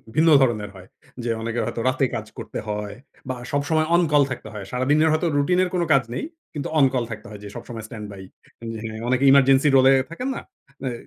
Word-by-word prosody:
ভিন্ন 160 +1 +5
ধরনের 110 -5 +1
হয়। 95 -1 -13 0.4
যে 120 - -2
অনেকে 115 +1 -2
হয়তো 115 - -3
রাতে 130 +1 +1
কাজ 110 - -4
করতে - - -6
হয় 105 -1 -4 0.3
বা 130 - -1 0.2
সবসময় 155 +3 +1
অন 175 - +5
কল 145 -1 +5
থাকতে 120 -4 -6
হয়। 100 -2 -7
সারাদিনের 145 +5 +2
হয়তো 155 +3 +1
রুটিন 180 +6 +2
এর 185 - -1
কোন 175 - +1
কাজ 135 -2 +4
নেই। - - -3 0.3
কিন্তু 145 -3 -4
অন 140 - +7
কল 125 -2 +1
থাকতে 110 +2 -7
হয় 105 - -9
যে, - - -7
সবসময় 115 -2 -7
স্ট্যান্ডবাই, 105 -4 -8 0.8
অনেকে 130 +2 +1
এমার্জেন্সি 135 +1 +5
রোল 130 -1 +6
এ - - +6 0.2
থাকেন 250 +11 -4
না? - - -5 0.4
অ্যা 130 - -1
130 Hz, 205 wpm, -23 LUFS, 110-145 Hz, 0.8 s, অন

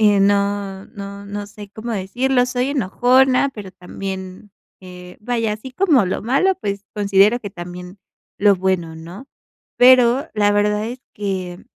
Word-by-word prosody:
eh, 205 -2 +4
no 200 -1 0
no 200 0 -9
no 205 0 -5
sé 205 -1 -12
cómo 230 +2 -6
decirlo. 245 +5 0
Soy 250 +1 -1
enojona, 255 +2 +3
pero 200 -4 -9
también, 190 +1 -8 0.3
eh, 180 -1 -12
vaya 230 -1 -1
así 220 +5 -8
como 300 - +3
lo 185 - -3
malo, 275 - +2
pues 200 -2 -4
considero 205 +3 +3
que 205 - -7
también 180 +1 -9 0.4
lo 205 0 +5
bueno, 180 -3 -1
¿no?, 170 +10 -10 0.5
pero 255 +3 +5
la 205 -1 +3
verdad 210 +1 +1
es 250 +1 -8
que 185 -3 -4
205 Hz, 150 wpm, -20 LUFS, 190-245 Hz, 0.5 s, lo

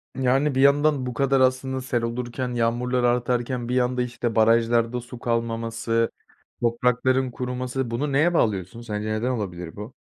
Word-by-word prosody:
Yani, 135 +2 +1
bir 130 - +2
yandan 140 -1 +4
bu 125 - -4
kadar 135 +2 +2
aslında 130 +1 +1
sel 120 -2 -1
olurken, 120 +2 -3
yağmurlar 120 +2 0
artarken 120 0 0
bir 125 - 0
yanda 125 0 +1
işte 120 -1 -3
barajlarda 115 +2 +3
su 120 0 -11
kalmaması, 115 -1 -1 0.5
toprakların 125 +2 +1
kuruması, 125 0 -3
bunu 140 +5 -1
neye 155 +6 +3
bağlıyorsun? 105 - 0
Sence 105 -2 -4
neden 110 +4 -1
olabilir 90 -8 -4
bu? 105 +5 -8
125 Hz, 150 wpm, -24 LUFS, 115-130 Hz, 0.5 s, yandan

